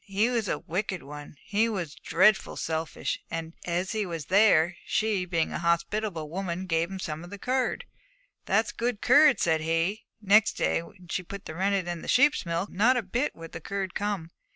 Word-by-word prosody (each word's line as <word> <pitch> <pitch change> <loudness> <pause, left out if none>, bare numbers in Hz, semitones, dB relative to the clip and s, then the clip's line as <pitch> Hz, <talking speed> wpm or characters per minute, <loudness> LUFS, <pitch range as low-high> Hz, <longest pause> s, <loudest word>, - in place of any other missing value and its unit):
He 205 +5 +1
was 230 -4 0
a - - 0
wicked 185 +1 -3
one; 145 +1 -10
he 220 +2 +1
was 180 -8 -3
dreadful 210 +1 +2
selfish; 160 0 -3
and 165 0 -5
as 180 +2 -1
he 215 -1 -1
was 165 -5 -5
there, 185 -5 +5
she, 215 -4 0
being 170 -3 0
a - - -3
hospitable 170 0 -1
woman, 180 +2 -4
gave 165 -1 0
him 195 - -6
some 160 -2 -5
of 175 - -10
the 205 - -8
curd. 255 - -1 0.6
"That's 225 - +2
good 235 -2 -2
curd," 290 -7 +6
said 160 -2 +2
he. 165 +6 -1
Next 210 +1 +4
day, - - 0
when 180 +1 -15
she - - -1
put 200 +2 -9
the - - -6
rennet 190 +1 0
in 175 -1 -4
the - - -9
sheep's 285 -6 +3
milk, 170 +4 -2
not 240 +6 +3
a 240 - 0
bit 240 +9 -1
would 165 0 -10
the 165 - -7
curd 195 +1 -4
come. 200 -5 -3
185 Hz, 200 wpm, -27 LUFS, 165-215 Hz, 0.6 s, curd